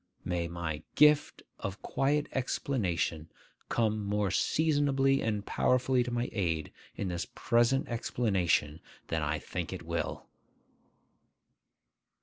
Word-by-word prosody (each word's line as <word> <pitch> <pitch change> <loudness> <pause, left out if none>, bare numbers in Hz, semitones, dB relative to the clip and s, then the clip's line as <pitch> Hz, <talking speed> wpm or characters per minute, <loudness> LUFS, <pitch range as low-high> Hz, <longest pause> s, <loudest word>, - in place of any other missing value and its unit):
May 85 -1 -1
my 85 -3 -4
'gift 150 -1 +4 0.2
of 95 0 -5
quiet 145 +2 +1
explanation' 95 - -1 0.4
come 110 -2 +1
more 100 -1 0
seasonably 140 - +2
and 105 -2 -1
powerfully 130 0 +2
to 125 - -1
my 120 +1 -1
aid 80 -7 -1 0.2
in 95 - -3
this 85 0 -3
present 120 +2 +2
explanation 95 -10 0 0.3
than 80 -1 0
I 75 +1 0
think - - -5
it - - -6
will! - - -3
110 Hz, 115 wpm, -31 LUFS, 85-130 Hz, 0.4 s, gift